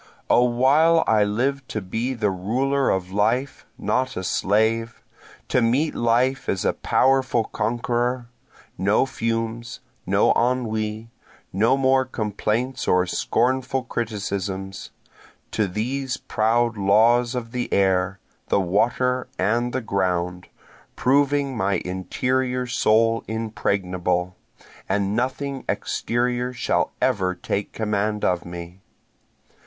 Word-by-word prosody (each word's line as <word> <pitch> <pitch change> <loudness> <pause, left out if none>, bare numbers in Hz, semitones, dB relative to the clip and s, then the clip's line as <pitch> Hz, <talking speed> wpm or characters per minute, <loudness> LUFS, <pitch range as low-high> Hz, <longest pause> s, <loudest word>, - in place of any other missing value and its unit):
O 120 - +6
while 140 +7 +4
I 110 -2 +4
live 130 +6 -1
to 110 - -3
be 115 +7 -3
the 105 -4 0
ruler 130 +9 0
of 95 -1 -1
life, 115 +7 0
not 130 0 -1
a 95 - -3
slave, 110 +5 0 0.5
To 125 - +2
meet 130 +7 +2
life 125 +3 +1
as 95 - -1
a - - +2
powerful 130 -3 +2
conqueror, 120 +2 -1 0.5
No 100 +7 +3
fumes, 115 -1 -3 0.3
no - - +3
ennui, 115 -2 -1 0.4
no 115 +8 +3
more 135 0 +3
complaints 120 +2 -2
or 90 0 +3
scornful 130 +7 0
criticisms, 100 -5 -4 0.6
To 110 - 0
these 125 +7 -2
proud 115 0 +1
laws 115 +5 +3
of 115 -2 -4
the 125 0 -3
air, 95 -1 +2 0.3
the - - +2
water 115 +7 +1
and 115 +6 +1
the 130 - -2
ground, 90 -4 -1 0.5
proving 140 0 +2
my 100 -2 0
interior 125 +8 -1
soul 115 -1 +2
impregnable, 90 -5 -1 0.5
And 100 +1 0
nothing 130 +2 -2
exterior 125 +1 -1
shall - - 0
ever 95 -8 +1
take 100 +3 -3
command 105 -1 -1
of 90 -1 0
me. 85 +1 -9
115 Hz, 115 wpm, -23 LUFS, 100-125 Hz, 0.6 s, O